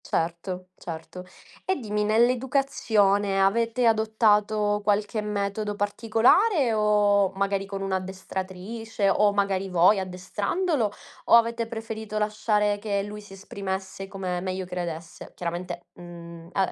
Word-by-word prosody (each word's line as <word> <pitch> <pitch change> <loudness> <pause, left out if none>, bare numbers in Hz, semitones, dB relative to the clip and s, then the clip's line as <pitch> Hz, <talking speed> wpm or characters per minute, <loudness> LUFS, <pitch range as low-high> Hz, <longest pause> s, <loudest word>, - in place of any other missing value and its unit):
Certo, 180 +2 -3
certo. 165 +1 -8 0.4
E 380 - 0
dimmi, 210 - -2
nell'educazione 220 -4 +2
avete 230 +5 +2
adottato 215 -2 +2
qualche 210 +1 +1
metodo 210 0 -2
particolare 230 - +3
o 205 -2 +3
magari 195 0 -1
con 195 0 -5
un'addestratrice 190 +3 -3
o 210 +1 +4
magari 195 -1 0
voi 180 +3 +5
addestrandolo, 205 - -1 0.3
o - - +6
avete 230 0 +3
preferito 220 -2 -5
lasciare 210 -1 +1
che 200 -1 -1
lui 210 +1 -7
si 205 -1 -14
esprimesse 195 0 -5
come 185 -2 -4
meglio 185 0 -3
credesse? 170 -2 -6
Chiaramente, 175 +1 -5
mhmm, 170 -1 -11
a 195 -1 +1
205 Hz, 115 wpm, -26 LUFS, 190-220 Hz, 0.4 s, o